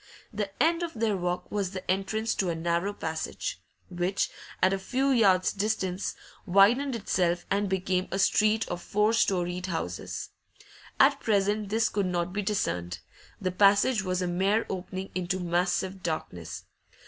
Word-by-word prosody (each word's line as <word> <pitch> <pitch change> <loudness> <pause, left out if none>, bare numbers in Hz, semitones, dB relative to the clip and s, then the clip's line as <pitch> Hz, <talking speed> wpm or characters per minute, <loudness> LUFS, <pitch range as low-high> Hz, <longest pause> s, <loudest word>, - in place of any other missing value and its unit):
The 205 -1 -2
end 330 +5 +3
of 340 -4 -4
their 220 -2 +1
walk 180 -1 -3
was 200 -3 -1
the 185 -1 -3
entrance 215 +4 -1
to 190 - -1
a 170 - -1
narrow 170 +4 0
passage, 160 - -4 0.3
which, 180 +2 -1 0.3
at 185 +1 +4
a 195 - -1
few 260 +7 0
yards' 195 -7 +4
distance, 195 -2 -1 0.3
widened 235 +9 +4
itself 175 -5 0
and 200 0 +1
became 185 -1 0
a 195 - -1
street 215 +2 +3
of 175 - -4
four 210 +4 +1
storeyed 180 -4 +1
houses. 160 - -4 0.7
At - - +5
present 205 -1 +1
this 220 +1 +2
could 200 -2 -1
not 175 0 -1
be 205 - -1
discerned; 90 - -1 0.4
the 185 -2 -1
passage 205 +5 +4
was 185 -2 -1
a - - -1
mere 195 +5 +1
opening 190 0 -5
into 185 +1 -1
massive 180 +2 0
darkness. 90 - -5
190 Hz, 155 wpm, -28 LUFS, 180-210 Hz, 0.7 s, At